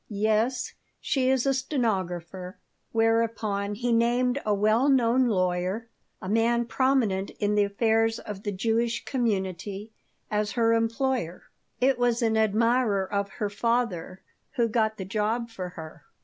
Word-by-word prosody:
"Yes. 220 +4 0 0.3
She 260 -2 0
is 265 -1 +2
a 275 - +3
stenographer." 190 - -2 0.3
Whereupon 225 -3 0
he 240 +3 -1
named 245 +3 +2
a 215 - 0
well 215 +6 +3
known 255 -1 +3
lawyer, 185 +2 -1 0.3
a 185 - -8
man 230 +3 +2
prominent 240 -7 +1
in 205 0 +1
the 205 -1 +3
affairs 225 +2 +1
of 205 -2 -7
the 205 - -3
Jewish 230 +4 -1
community, 205 -4 -2 0.4
as 210 -1 0
her 230 -1 +3
employer. 230 -4 -1 0.4
"It 260 0 +2
was 240 -1 +1
an 225 -1 +2
admirer 220 -1 +2
of 200 0 0
her 210 - -2
father 205 -5 -1 0.3
who 235 -1 +2
got 220 -1 0
the 190 - -5
job 220 +4 -1
for 185 -5 -5
her." 160 -3 -11
225 Hz, 140 wpm, -26 LUFS, 200-235 Hz, 0.4 s, a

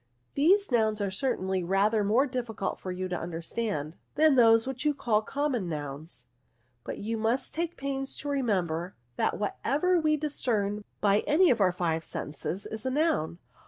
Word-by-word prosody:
These 380 +7 +3
nouns 220 -3 +2
are 200 -2 -1
certainly 190 -4 -1
rather 200 +4 +2
more 225 +7 +3
difficult 240 -7 -3
for 185 - -5
you 185 +1 -3
to 180 - -3
understand, 170 -1 -3 0.2
than 310 0 +5
those 225 -3 +6
which 265 0 -4
you 300 -1 +2
call 215 -5 +1
common 255 -6 -2
nouns; 145 -2 -6 0.6
but - - -5
you 225 +2 -3
must 230 +4 0
take 340 +1 -3
pains 270 0 -3
to 290 - -6
remember, 185 - -1 0.2
that - - +1
what 205 0 -3
ever 350 +6 +2
we 310 -1 +2
discern 215 -9 -1 0.2
by 205 0 +4
any 330 +3 +5
of 230 -3 +1
our 185 -2 +5
five 165 -2 -1
senses 155 +6 -4
is 220 -1 -5
a 260 - 0
noun." 290 - 0
220 Hz, 170 wpm, -28 LUFS, 185-275 Hz, 0.6 s, those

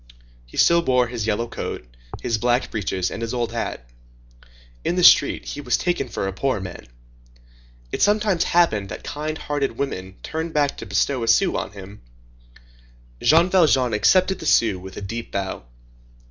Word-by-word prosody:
He - - -13
still 170 0 +5
wore 125 -4 +3
his 115 -3 -4
yellow 110 +2 0
coat, - - -6 0.4
his 115 -2 0
black 120 +3 +1
breeches, 95 -3 -2
and - - -6
his 115 +1 -3
old 120 -2 -1
hat. 115 - -4 1.0
In 175 - 0
the 180 - +1
street, 140 - +6
he 145 - -5
was - - +1
taken 175 -8 -1
for 100 - -3
a 95 - -3
poor 130 +2 -1
man. 90 -8 -8 1.0
It - - -3
sometimes 205 -4 +2
happened 110 - +2
that 90 - -7
kind 155 +1 -4
hearted 140 -6 -2
women 95 -9 -4
turned 160 0 -4
back 145 -2 +2
to - - -8
bestow 135 -3 0
a 115 - -2
sou 180 +11 +3
on - - -3
him. 100 +1 -11 1.2
Jean 165 +4 +4
Valjean 140 - +3
accepted 185 - +3
the 160 - -5
sou 110 -9 +3
with 95 +1 -10
a - - -5
deep 115 +4 -6
bow. 95 -10 -4
120 Hz, 175 wpm, -22 LUFS, 105-160 Hz, 1.2 s, street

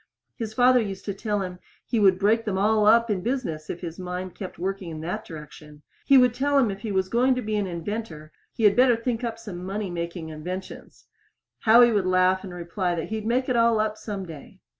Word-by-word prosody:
His 220 -2 -6
father 250 +1 +5
used 195 -3 -5
to 200 - -2
tell 205 +1 -2
him 180 -1 -7 0.3
he 235 - 0
would 190 -3 +5
break 220 +4 +2
them 205 -4 -2
all 210 +1 +3
up 230 +1 +5
in 190 -3 -1
business 180 - -3
if 175 - -5
his 170 -1 -7
mind 180 0 -5
went 190 - -6
on 175 - -7
working 195 -2 -3
in 155 -1 -7
that 180 +7 -4
direction. 150 -1 -11 0.2
He 275 - +7
would 250 -2 +5
tell 280 +3 +1
him 240 -6 +3
if 195 - -7
he 215 0 -5
was 190 -1 0
going 250 +5 +2
to 250 - -2
be 215 0 -2
an 205 -2 0
inventor 170 -3 -6 0.2
he 230 - -5
had 205 -2 +6
better 250 -1 +5
think 230 +1 -3
up 230 -1 -3
some 185 -6 -8
money 195 0 -4
making 170 -1 -5
inventions. 180 +5 -8 0.5
Howie 235 +2 +6
would 200 -4 +1
laugh 185 0 +3
and 190 - -7
reply 175 +1 -2
that 165 - -4
he'd 220 0 -4
make 255 +3 +1
it 255 - 0
all 230 -1 +3
up 215 0 0
some 205 -3 -6
day. 165 +3 -12
200 Hz, 230 wpm, -25 LUFS, 180-230 Hz, 0.5 s, He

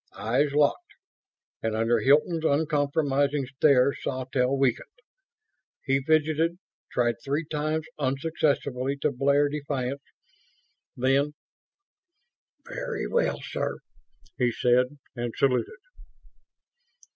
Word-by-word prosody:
Eyes 135 +6 +1
locked, 150 - +1 0.7
and 110 -1 -1
under 115 +1 +2
Hilton's 150 +7 +3
uncompromising 145 -2 +1
stare 135 0 +3
Sawtelle 130 +1 -1
weakened. 135 -3 0 1.0
He 135 0 +2
fidgeted; 160 +3 +1 0.3
tried 120 -1 +1
three 145 +4 -1
times 155 +1 -2
unsuccessfully 140 -2 -1
to 150 - +2
blare 140 +2 +2
defiance. 140 -2 -3 1.0
Then, 135 +4 +2 1.3
"Very - - -4
well 485 - 0
sir," - - -3 0.6
he 125 -1 +3
said, 125 +2 +3 0.3
and 120 -1 -4
saluted. 140 - +1
140 Hz, 90 wpm, -26 LUFS, 130-150 Hz, 1.3 s, Hilton's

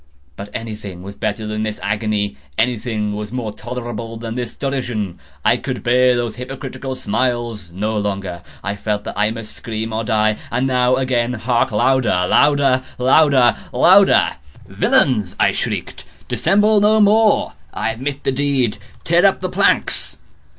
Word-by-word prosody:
But 100 +5 -8
anything 105 -5 -6
was 100 +1 -8
better 105 +2 -3
than 105 0 -3
this 110 -1 -3
agony! 105 -2 -1 0.2
Anything 110 -3 -1
was 105 0 -5
more 120 -4 -4
tolerable 120 -2 -6
than 115 0 -5
this 120 -1 -5
derision! 120 -9 -3 0.3
I - - +4
could - - -5
bear 125 +1 +4
those 120 -2 -2
hypocritical 135 +1 -6
smiles 120 -4 -2
no 105 +6 -3
longer! 95 -4 -3 0.2
I 100 0 -2
felt 105 0 -2
that - - -5
I 105 +1 +2
must 115 -1 -6
scream 110 0 -5
or 110 +1 -1
die! 110 -1 +1
and 125 +2 0
now—again!—hark! 125 -1 +1
louder! 110 -4 +2
louder! 140 -1 +3
louder! 130 -1 +4 0.2
louder! 185 - +5 0.3
"Villains!" 105 -8 +1
I - - +4
shrieked, - - -4 0.2
"dissemble 210 +1 +3
no 215 +1 +4
more! 215 +1 +4 0.2
I - - -2
admit 135 +5 -5
the - - +1
deed!—tear 135 -4 0
up - - +4
the - - -2
planks! - - +1
120 Hz, 145 wpm, -19 LUFS, 105-130 Hz, 0.3 s, louder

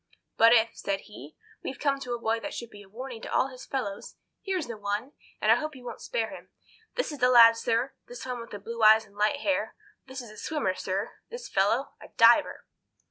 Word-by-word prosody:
"But 230 +1 +6
if," 230 -1 +5
said 195 -1 -2
he, 155 - -12 0.3
"we 270 - -4
come 280 -2 0
to 250 -3 -3
a - - -7
boy 225 0 0
that 295 +4 -6
should 235 -1 -7
be 205 - -12
a 195 - -16
warning 245 +2 -8
to - - -7
all 265 - +2
his 255 -1 -11
fellows, 205 -7 -4 0.3
here's 380 -5 -2
the 235 - -6
one, 210 +5 -3 0.3
and - - +3
I - - +8
hope 305 -1 -4
you 250 -1 -13
won't - - -7
spare - - -2
him. - - -13 0.5
This - - -1
is 295 - -7
the 250 - +4
lad, 230 -2 +8
sir—this 240 +2 -3
one 250 -1 -4
with 230 - -9
the 205 - -6
blue 230 +3 -7
eyes 220 +1 +7
and 200 -1 -23
light 215 +8 +1
hair. 295 0 -1 0.3
This 260 +1 -7
is 240 -4 -9
a 215 - -14
swimmer, 295 -7 -1
sir—this 200 - -5
fellow—a - - 0
diver. - - +5
235 Hz, 220 wpm, -28 LUFS, 215-270 Hz, 0.5 s, I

